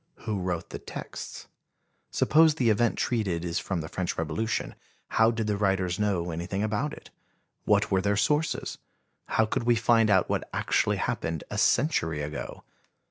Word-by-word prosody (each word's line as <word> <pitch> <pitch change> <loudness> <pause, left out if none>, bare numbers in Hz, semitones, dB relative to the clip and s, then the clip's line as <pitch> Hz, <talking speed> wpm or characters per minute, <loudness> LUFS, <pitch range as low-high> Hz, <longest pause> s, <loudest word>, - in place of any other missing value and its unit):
Who 105 -3 -1
wrote 90 -2 -3
the - - -5
texts? - - -8 0.6
Suppose 155 0 +4
the 120 -7 +3
event 115 +2 +2
treated 95 -8 -1
is 85 +1 -1
from 90 -4 -3
the 80 - -6
French 90 +2 -3
Revolution. 105 +8 -2 0.4
How 110 0 +4
did 115 -1 -1
the 105 -1 0
writers 95 -2 0
know 95 -5 0
anything 90 +5 -3
about 110 +8 -1
it? - - -12 0.5
What - - +3
were 95 - +3
their 100 +1 +1
sources? 150 +8 0 0.5
How 110 - +2
could 110 +2 -2
we 120 0 +4
find 115 -1 +3
out 95 -3 +4
what - - -2
actually - - +1
happened 80 -2 -2
a 105 - -2
century 80 - +2
ago? 75 -1 -6
105 Hz, 165 wpm, -27 LUFS, 90-115 Hz, 0.6 s, Suppose